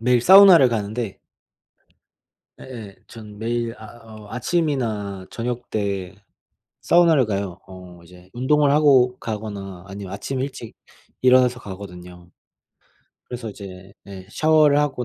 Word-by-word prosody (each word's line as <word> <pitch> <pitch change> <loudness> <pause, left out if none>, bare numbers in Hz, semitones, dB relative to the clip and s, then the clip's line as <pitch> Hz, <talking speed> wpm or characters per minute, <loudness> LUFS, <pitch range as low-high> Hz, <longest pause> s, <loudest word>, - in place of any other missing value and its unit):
매일 125 +1 +2
사우나를 185 -4 +8
가는데 110 -1 -4 1.4
예예 110 -7 -10
전 105 -2 -12
매일 115 +1 -3
아 110 +2 -13
어 110 -2 -13
아침이나 115 - -2
저녁때 105 -6 -4 0.7
사우나를 165 -6 +4
가요. 100 -3 -4
어 90 -2 -13
이제 90 +1 -18
운동을 140 +3 +2
하고 130 -4 +4
가거나 100 -4 -7
아니면 95 -1 -8
아침에 130 +6 -4
일찍 125 -5 -8 0.5
일어나서 125 -1 +4
가거든요. 90 -4 -11 1.0
그래서 120 -3 -6
이제 95 -1 -12
예 95 -1 -11
샤워를 155 +1 +3
하고 135 -4 -1
110 Hz, 265 characters per minute, -21 LUFS, 100-130 Hz, 1.4 s, 사우나를